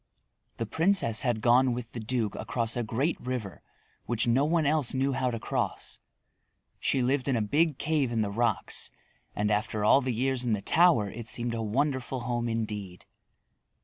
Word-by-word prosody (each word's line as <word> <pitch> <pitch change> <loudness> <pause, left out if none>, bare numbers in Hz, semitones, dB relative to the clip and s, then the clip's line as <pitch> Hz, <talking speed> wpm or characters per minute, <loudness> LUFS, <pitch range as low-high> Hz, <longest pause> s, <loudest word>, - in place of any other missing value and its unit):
The 115 - -2
princess 160 - +1
had 120 -3 -1
gone 125 +1 +4
with 120 -1 -6
the 120 - -6
duke 110 -1 -1
across 115 -2 -2
a 120 - 0
great 130 +9 -1
river 125 -7 -5 0.5
which 120 -1 +1
no 125 +4 +3
one 160 0 +1
else 145 -3 +1
knew 135 +1 +1
how 130 -1 0
to 115 -2 -3
cross. - - -3 0.8
She 130 - +1
lived 130 +1 0
in 135 - +2
a - - +1
big 150 +6 +1
cave 150 -5 0
in 115 -2 0
the 100 -2 -1
rocks, 115 0 -1 0.5
and 105 +1 0
after 105 0 0
all 135 - +6
the 130 - -1
years 130 +2 0
in 120 -3 0
the 105 - -1
tower 165 - +4
it 115 -1 -8
seemed 120 +1 -2
a 115 - -2
wonderful 130 +3 -1
home 120 0 -2
indeed. 105 -5 -4
120 Hz, 180 wpm, -28 LUFS, 110-135 Hz, 0.8 s, all